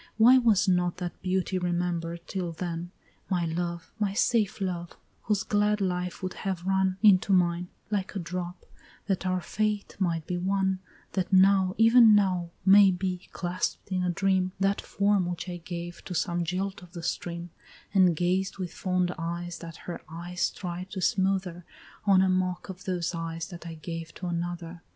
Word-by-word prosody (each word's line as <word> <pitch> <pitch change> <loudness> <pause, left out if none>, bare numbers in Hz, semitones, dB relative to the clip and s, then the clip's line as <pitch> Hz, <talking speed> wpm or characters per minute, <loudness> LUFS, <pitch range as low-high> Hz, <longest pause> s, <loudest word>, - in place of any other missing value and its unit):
Why 245 +4 +8
was 220 -6 +3
not 180 -1 +2
that 180 -1 -5
beauty 185 0 0
remember'd 175 -1 -2
till 180 -3 -3
then? 170 0 -4 0.4
My 180 -3 +1
love, 170 0 -3
my 200 -2 0
safe 220 -2 +2
love, 175 -3 -3 0.3
whose 205 -3 +1
glad 210 +1 +2
life 180 -2 -2
would 185 - -2
have 185 -3 -3
run 190 -1 +2
Into 200 -2 +6
mine 175 -1 +2 0.2
like 205 -1 -2
a - - -1
drop 180 0 -5 0.4
that 190 -2 -1
our 185 0 0
fate 210 +2 -2
might 165 -4 0
be 180 -1 -2
one, 190 0 +1 0.3
That 185 -1 -2
now, 190 0 +5
even 225 -1 +7
now, 185 -4 +2 0.2
may 200 0 +8
be, 185 0 -3
clasp'd 180 +2 -3
in 185 -1 +1
a 180 - +1
dream, 185 0 +1
That 195 +1 +1
form 200 -2 +1
which 175 +1 -4
I 175 -1 -4
gave 175 0 -7
to 180 - -5
some 175 +1 0
jilt 190 +3 -2
of 180 -1 -15
the 170 -2 -7
stream, 170 0 -4 0.4
And 185 -4 +5
gazed 180 +3 0
with 180 -3 -5
fond 180 -1 0
eyes 170 +1 -4
that 165 -1 -8
her 175 - -5
tears 175 +2 -2
tried 180 0 -6
to 190 - -3
smother 185 -2 0 0.4
On 190 -2 +5
a - - +3
mock 185 0 0
of 185 0 -8
those 180 -2 -1
eyes 165 0 -4
that 175 -2 -9
I 165 - -6
gave 165 +1 -7
to 185 - -7
another! 175 0 -4
180 Hz, 175 wpm, -28 LUFS, 175-190 Hz, 0.4 s, Why